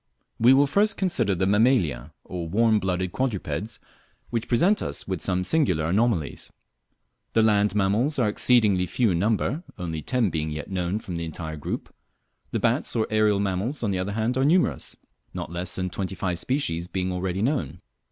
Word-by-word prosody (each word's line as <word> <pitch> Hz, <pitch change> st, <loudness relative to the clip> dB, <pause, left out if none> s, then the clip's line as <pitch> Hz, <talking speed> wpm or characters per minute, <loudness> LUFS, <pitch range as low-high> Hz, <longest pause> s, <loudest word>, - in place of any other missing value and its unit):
We 125 Hz, +4 st, +6 dB
will 140 Hz, +1 st, +5 dB
first 200 Hz, +8 st, +2 dB
consider 120 Hz, -, +1 dB
the 95 Hz, +2 st, 0 dB
Mammalia 100 Hz, -, +2 dB
or 90 Hz, -2 st, -5 dB
warm 110 Hz, +3 st, +3 dB
blooded 90 Hz, -1 st, -1 dB
quadrupeds, 105 Hz, -, -3 dB, 0.5 s
which 115 Hz, -1 st, -2 dB
present 180 Hz, -, +3 dB
us -, -, -4 dB
with 95 Hz, -4 st, -3 dB
some 90 Hz, -1 st, +1 dB
singular 90 Hz, -, +1 dB
anomalies. 95 Hz, -3 st, 0 dB, 0.8 s
The 110 Hz, -, +4 dB
land 105 Hz, -2 st, +3 dB
mammals 105 Hz, +10 st, +1 dB
are 125 Hz, -5 st, +2 dB
exceedingly 105 Hz, -4 st, +3 dB
few 115 Hz, +4 st, +1 dB
in 85 Hz, -, 0 dB
number, 115 Hz, -, 0 dB, 0.2 s
only 80 Hz, -3 st, -4 dB
ten 120 Hz, -, 0 dB
being 80 Hz, -1 st, -2 dB
yet 75 Hz, +5 st, -6 dB
known 90 Hz, +1 st, -1 dB
from 95 Hz, -5 st, -6 dB
the 85 Hz, -, -3 dB
entire 80 Hz, -1 st, -6 dB
group. 75 Hz, -, -5 dB, 0.6 s
The -, -, -2 dB
bats -, -, +1 dB
or 110 Hz, -, +2 dB
aerial 105 Hz, -2 st, +3 dB
mammals, 100 Hz, +8 st, -2 dB
on 105 Hz, -, +1 dB
the 95 Hz, -, -1 dB
other 95 Hz, +2 st, -2 dB
hand, 115 Hz, +4 st, 0 dB
are -, -, +3 dB
numerous 145 Hz, -, +1 dB, 0.4 s
not -, -, -5 dB
less 85 Hz, +1 st, -3 dB
than 90 Hz, -1 st, -2 dB
twenty 95 Hz, -1 st, -4 dB
five 90 Hz, -2 st, -2 dB
species 85 Hz, -, -1 dB
being 95 Hz, 0 st, -2 dB
already 90 Hz, +2 st, -2 dB
known. 90 Hz, -, -1 dB
100 Hz, 180 wpm, -25 LUFS, 90-115 Hz, 0.8 s, We